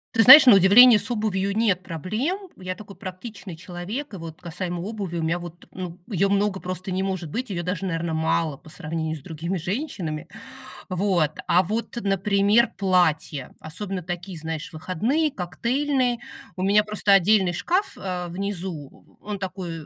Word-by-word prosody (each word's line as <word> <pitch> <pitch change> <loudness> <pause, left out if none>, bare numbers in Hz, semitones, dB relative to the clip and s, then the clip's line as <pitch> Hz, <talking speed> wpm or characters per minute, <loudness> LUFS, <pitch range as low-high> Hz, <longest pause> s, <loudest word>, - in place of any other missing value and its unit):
Ты 225 - +5
знаешь, 265 +6 +11
на 250 - +9
удивление, 210 +5 +8
с - - -1
обувью 205 -3 -1
нет 205 -5 +2
проблем. 205 - -3 0.2
Я 185 0 -6
такой 200 -1 -12
практичный 185 -1 -8
человек. 185 - -6
И - - -6
вот 165 -1 -9
касаемо 175 0 -5
обуви 195 -3 -5
у 165 - -2
меня 165 +2 0
вот, 175 0 -11
ну, 180 -2 -7
ее 200 -3 +1
много 200 -1 +1
просто 185 +1 -5
не 185 +1 -1
может 185 -5 -3
быть, 250 +5 -3
ее 175 -3 -3
даже, 180 +2 -3
наверно, 165 -1 -2
мало 160 -2 0
по 155 - -16
сравнению 160 -1 -4
с - - -13
другими 170 +4 -4
женщинами. 175 - -4 0.6
Вот, 185 -5 +1 0.2
а 180 +2 +4
вот, 220 +6 -3
например, 200 +3 +2
платья. 175 -8 +1
Особенно 185 +3 -6
такие, 175 +1 -6
знаешь, 160 +3 -5
выходные, 225 - -1
коктейльные. 250 +6 -1 0.4
У 185 - -5
меня 200 +2 +4
просто 210 -1 +1
отдельный 195 -1 +4
шкаф, 360 - -1
а, 180 -2 -4
внизу. 180 -5 -6
Он 205 -1 -6
такой, 180 -4 -6
185 Hz, 165 wpm, -24 LUFS, 170-210 Hz, 0.6 s, знаешь